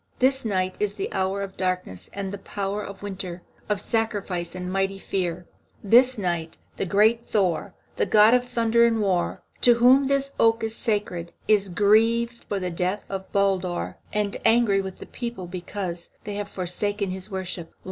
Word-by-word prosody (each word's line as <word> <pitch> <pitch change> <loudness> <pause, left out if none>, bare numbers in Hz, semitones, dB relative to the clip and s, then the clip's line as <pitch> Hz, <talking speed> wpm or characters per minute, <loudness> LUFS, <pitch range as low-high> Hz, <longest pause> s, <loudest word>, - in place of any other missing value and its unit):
This 265 +1 +2
night 185 -4 0
is 205 -1 -1
the 195 - -4
hour 190 +1 0
of 195 -1 -7
darkness 180 - -3
and 200 -1 -4
the 200 - -5
power 200 +1 -3
of 200 0 -9
winter, 185 -3 -6 0.3
of 210 -1 +1
sacrifice 200 -7 -2
and 180 0 -4
mighty 195 0 0
fear. 180 -3 -2 0.4
This 245 +5 +5
night 170 -4 -2 0.2
the 195 - -2
great 220 +5 +4
Thor, 185 -8 0 0.2
the - - +1
god 210 +4 +6
of 250 0 +4
thunder 235 -1 +2
and 230 -1 +3
war, 190 -4 0 0.2
to 240 -1 +7
whom 255 +3 +5
this 275 0 +1
oak 225 0 +4
is 225 0 -2
sacred, 205 -8 -2
is 205 -2 +3
grieved 225 +5 +3
for 200 - -1
the 180 -1 -3
death 180 +4 -2
of 190 -1 -5
Baldur, 190 -3 0
and 210 -1 -1
angry 225 -3 +4
with 190 -1 -7
this - - -10
people 235 -7 -5
because 175 0 -5
they 205 - -5
have 205 0 -4
forsaken 195 +2 -2
his 190 +2 -5
worship. 185 -4 -5
200 Hz, 175 wpm, -25 LUFS, 185-225 Hz, 0.4 s, to